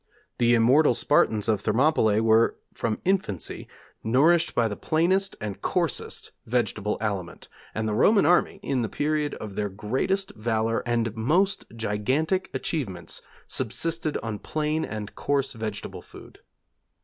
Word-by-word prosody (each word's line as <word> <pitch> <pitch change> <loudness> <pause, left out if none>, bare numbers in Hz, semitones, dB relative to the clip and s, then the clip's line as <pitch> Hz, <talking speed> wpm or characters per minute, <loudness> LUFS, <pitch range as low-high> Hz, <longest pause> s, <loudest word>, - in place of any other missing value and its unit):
The 120 0 +5
immortal 125 +4 +5
Spartans 105 -2 +2
of 105 -3 +1
Thermopylæ 110 -2 +3
were, 115 +1 +4 0.2
from 110 -2 -2
infancy, 185 - -1 0.4
nourished 155 +9 +3
by 115 -2 +3
the 105 - -4
plainest 185 - +1
and 105 -3 -5
coarsest - - -2 0.2
vegetable 110 -3 0
aliment: 100 -5 -4 0.3
and 110 0 -1
the 105 - -1
Roman 200 - +4
army, 175 +3 +3
in 130 -3 0
the 110 - -2
period 150 0 -1
of 105 -2 -7
their 105 0 -2
greatest 135 - -1
valour 110 +1 0
and 115 -2 0
most 175 - +1
gigantic 130 - 0
achievements, 100 - -3 0.2
subsisted 165 -2 -1
on 110 -3 -4
plain 155 +1 -1
and 105 -1 -6
coarse 140 -1 -1
vegetable 110 -3 -5
food. - - -14
115 Hz, 135 wpm, -26 LUFS, 110-155 Hz, 0.4 s, The